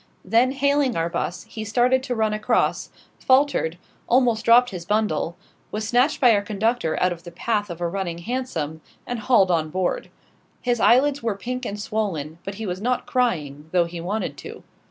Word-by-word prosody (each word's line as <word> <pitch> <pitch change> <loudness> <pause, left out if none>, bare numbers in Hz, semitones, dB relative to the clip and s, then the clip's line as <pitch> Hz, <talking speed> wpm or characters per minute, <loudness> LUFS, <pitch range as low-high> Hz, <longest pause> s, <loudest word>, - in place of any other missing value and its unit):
Then, 235 +7 +3
hailing 280 -2 +2
our 165 0 0
'bus, 175 - -3
he 220 - -7
started 245 +4 +2
to 255 -2 -3
run 220 -1 +1
across 215 0 0 0.3
faltered 260 - +2 0.3
almost 240 -3 +3
dropped 240 +2 +5
his 180 -3 -6
bundle 175 -4 0 0.3
was 215 +1 -3
snatched 250 +6 +2
by 245 -4 +6
our 205 - +2
conductor 215 -3 -1
out 180 - +2
of 170 - -12
the 175 - -10
path 205 +4 -2
of 170 -1 -7
a 175 - -1
running 175 -1 -3
hansom, 170 - -4 0.2
and 245 -1 -4
hauled 210 -5 +4
on 160 -2 +1
board. 185 +2 -2 0.5
His 245 -1 0
eyelids 275 +5 +4
were 225 -3 -1
pink 250 +5 -4
and 205 +1 -5
swollen; 170 -8 -3
but 195 - -6
he 220 +2 -5
was 185 0 -4
not 250 +3 0
crying, 155 - -1
though 175 -2 +4
he 170 0 -7
wanted 205 +6 -3
to. - - -10
215 Hz, 185 wpm, -23 LUFS, 175-245 Hz, 0.5 s, by